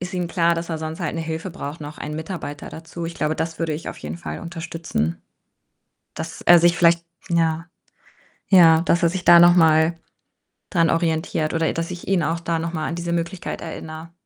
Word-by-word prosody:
ist 180 +2 -5
ihm 175 -1 -2
klar, 170 -1 +2
dass 165 0 -4
er 160 - -1
sonst 160 0 -6
halt - - -2
'ne - - -2
Hilfe 160 +3 -4
braucht, 155 -3 -7
noch 150 +1 -8
1 150 0 -5
Mitarbeiter 160 -2 -6
dazu. 165 +1 -7
Ich 170 - -6
glaube, 155 +1 -1
das 165 0 -3
würde 165 -2 -1
ich 155 - -6
auf - - -7
jeden - - -6
Fall 170 - -6
unterstützen, 165 - -4 0.9
dass - - -6
er 175 - +7
sich 175 +1 +3
vielleicht 170 0 +4 0.2
ja, 165 0 +1 0.8
ja, 165 -4 +7
dass 170 0 +1
er 170 - +5
sich 185 0 -4
da 175 0 +9
noch 175 0 +7
mal 160 0 +4 0.7
dran 165 -3 +2
orientiert 160 -1 0
oder 165 -1 +1
ä - - 0
dass 165 0 -3
ich 175 - -8
ihn 190 -2 +2
auch 165 +2 -1
da 165 -1 -1
noch 165 +1 -4
mal 155 -2 -2
an 165 - -3
diese 170 0 -3
Möglichkeit 170 +2 -3
erinnere. 160 0 -8
165 Hz, 210 wpm, -22 LUFS, 160-170 Hz, 0.9 s, da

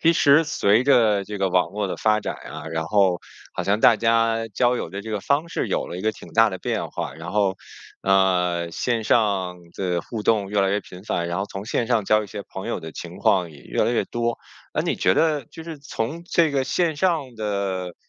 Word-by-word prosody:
其 165 - +5
实 145 -1 +5
随 115 -8 +2
着 115 -7 +4
这 105 +1 -6
个 95 -1 +1
网 90 -1 +2
络 105 +1 -2
的 95 - -4
发 110 -1 +2
展 105 - -4
呀， - - -8
然 80 0 -1
后 95 -2 +3 0.3
好 - - -2
像 100 +3 +1
大 115 - +6
家 115 0 +2
交 120 +4 +2
友 - - -4
的 100 - -5
这 110 +1 -7
个 105 - -1
方 145 - 0
式 - - -2
有 - - -1
了 - - -6
一 - - -5
个 110 - +2
挺 110 - -13
大 115 -1 +5
的 95 - -5
变 - - -2
化。 - - -4
然 80 +3 -8
后， 100 -2 +1 0.5
呃， 90 -3 +2
线 115 +2 -1
上 95 -6 +1 0.2
的 90 -2 -1
互 110 0 -6
动 105 -3 +2
越 105 -1 +2
来 95 0 +2
越 100 +1 +1
频 90 -1 -13
繁， 85 -5 -1
然 85 +1 -2
后 100 - -1
从 100 0 -7
线 115 +1 -1
上 115 -4 +1
交 105 +2 +3
一 - - -10
些 100 +1 -7
朋 95 - -6
友 - - -2
的 80 - -7
情 85 +2 -8
况 95 -4 +2
也 75 - -14
越 - - -1
来 120 - +1
越 120 - +1
多。 120 0 -2 0.4
那 - - +1
你 - - -1
觉 - - +3
得 155 -4 +2
就 165 - -11
是 160 -2 -8
从 140 +3 -4
这 170 -2 +2
个 135 -2 0
线 165 +1 0
上 150 -7 0
的 100 -4 -2
105 Hz, 255 characters per minute, -23 LUFS, 95-120 Hz, 0.5 s, 大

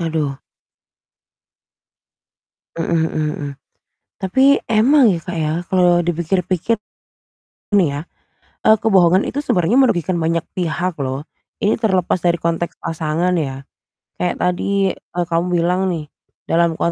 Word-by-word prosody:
Aduh. 155 -4 -2 2.4
Mhm 165 +1 -1 0.2
mhm 155 - -1 0.2
mhm. 145 - -4 0.7
Tapi 265 +9 +3
emang 235 +2 +4
ya, 170 - -2
Kak, 175 +1 -6
ya, 155 -1 0 0.2
kalau 180 -2 +4
dipikir-pikir 175 +5 -1 0.9
nih 195 -6 +4
ya, - - -3 0.7
eee, 220 0 +6
kebohongan 190 -4 +4
itu - - -7
sebenarnya 180 +7 +2
merugikan 185 - +2
banyak 165 0 0 0.2
pihak 175 0 -2
loh. 135 -1 -3 0.4
Ini 205 - +2
terlepas 190 -5 +1
dari 175 -1 0
konteks 170 +1 -2
pasangan 165 +2 -1
ya. 135 -4 -3 0.5
Kayak 180 - -2
tadi, 190 +2 0
eee, 175 0 -5
kamu 170 +1 0
bilang 180 +3 +1
nih 160 -4 -4 0.4
dalam 165 -1 +1
175 Hz, 120 wpm, -19 LUFS, 165-190 Hz, 2.4 s, eee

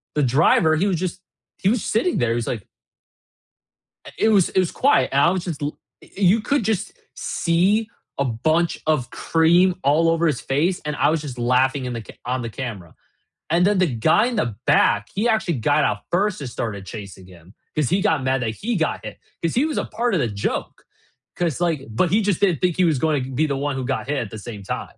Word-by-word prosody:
the 150 - +2
driver, 155 +4 +4
he 185 +6 +1
was 185 -4 0
just 185 +1 -4 0.4
he - - -1
was 230 -2 0
sitting 240 +12 0
there. 120 - +1
He - - 0
was 120 -1 -2
like 110 -5 -4 1.5
it 220 - +3
was 200 -5 +4
it 190 - +1
was 180 - +1
quiet, 280 - +3
and 140 +1 +3
I - - +5
was 185 -2 -2
just 160 -5 -5
l 145 - -3 0.2
eh, - - -17
you 200 +3 +4
could 280 +2 0
just 220 0 -1 0.2
see 190 +6 +1 0.3
a 140 - +1
bunch 155 +8 0
of 150 -6 0
cream 170 +3 +3
all 160 +4 +3
over 165 0 +2
his 150 - -1
face, 165 +7 0
and 150 0 -2
I - - +3
was 160 -1 0
just 135 -5 -7
laughing 130 +2 +2
in 125 - -3
the 115 - -4
ca - - -13
on 125 +1 -1
the 115 - -4
camera. 105 -9 -7 0.6
And 170 +2 +3
then 200 -1 +2
the 185 - +3
guy 125 - +2
in 250 - -3
the 120 -4 -1
back, 105 0 +3
he 210 +5 +1
actually 220 -7 +1
got 110 - +2
out 105 - 0
first 195 +2 +1
and 135 - -5
started 100 -5 -5
chasing 100 -4 -9
him 90 0 -17 0.2
'cause 150 -4 +1
he 185 +4 +1
got 160 -10 +1
mad 130 0 0
that 115 -2 -1
he 235 +2 0
got 160 -4 -1
hit - - -8 0.2
'cause 165 - -1
he 260 +5 +3
was 310 -2 -2
a - - -2
part 235 0 -2
of 180 - +2
the 120 - +1
joke. 100 -2 -4 0.5
'Cause, 175 -2 -2
like 165 -5 +1
but 140 +11 +1
he 215 +2 +3
just 200 -3 0
didn't 180 -8 +2
think 180 -2 +1
he 185 - +2
was 155 -6 +2
going 150 -5 +1
t 130 - -7
be 155 +4 +1
the 140 - -1
one 145 0 -2
who 130 -1 -3
got 135 0 -2
hit 150 - -1
at - - -18
the 110 - -7
same 105 -1 -8
time. - - -6
155 Hz, 240 wpm, -22 LUFS, 125-185 Hz, 1.5 s, I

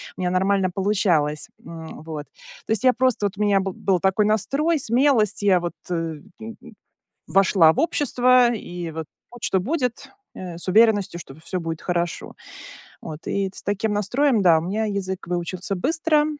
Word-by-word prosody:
у - - -7
меня 180 - 0
нормально 190 +1 +1
получалось, 175 -7 0 0.2
м, 165 -2 -9
вот. 155 -2 -7 0.4
То - - -5
есть, 220 +2 +1
я 255 - +6
просто, 255 -5 +1
вот, 200 0 -3
у - - -4
меня 205 -2 +3
бы 190 -1 -3
был 190 -1 0
такой 190 +3 +2
настрой, 275 - +1
смелость. 240 -4 +2
Я, 190 -3 +4
вот, 175 0 -4 0.2
э, 165 -3 -3 0.2
м, 225 +1 -8 0.7
вошла 190 -4 +5
в - - -3
общество. 255 -6 +3
И, 175 -5 -6
вот, 160 0 -5 0.3
будь 240 -2 -13
что 190 - +1
будет, 250 - -2 0.2
э, 180 -2 -7
с 175 - -9
уверенностью, 205 -3 +3
что 135 - -11
всё 170 +4 -5
будет 165 -1 -5
хорошо. 175 -1 -3 0.7
Вот, 155 0 -9
и 195 -1 0
с - - -10
таким 205 +2 -1
настроем, 225 +4 +1
да, 170 -3 +6
у 160 - -4
меня 210 +5 -2
язык 195 -3 -4
выучился 180 +2 -3
быстро. 305 - +1
195 Hz, 175 wpm, -23 LUFS, 175-225 Hz, 0.7 s, я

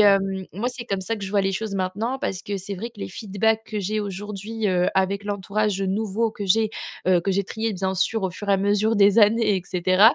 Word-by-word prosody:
hem, 195 -2 +3
moi, 210 +7 -1
c'est 245 -1 -5
comme 195 -4 -2
ça 225 +4 -2
que 200 - -6
je 190 - -5
vois 205 0 +3
les 195 0 +1
choses 200 +1 -3
maintenant 200 +7 -2
parce 185 -1 -2
que 205 - -3
c'est 195 +1 -5
vrai 230 +6 -5
que 220 -3 -15
les - - -4
feedbacks 220 +3 0
que 215 -1 -4
j'ai 215 +3 -1
aujourd'hui, 205 +2 -3
heu, 180 -1 +2
avec 195 +2 +1
l'entourage, 205 0 -1
heu, 195 - 0
nouveau 220 +3 0
que 205 -3 -6
j'ai, 220 +3 +3 0.4
heu, 180 -2 +5
que 195 +3 0
j'ai 200 +1 +1
trié 220 +3 -3
bien 190 0 -2
sûr, 220 +3 +1
au 190 - 0
fur 200 +3 -8
et - - +5
à - - +5
mesure 205 +3 +2
des 200 +1 +5
années, 215 -1 +5
et 185 - -1
cetera, 185 +6 +5
200 Hz, 255 wpm, -24 LUFS, 190-220 Hz, 0.4 s, heu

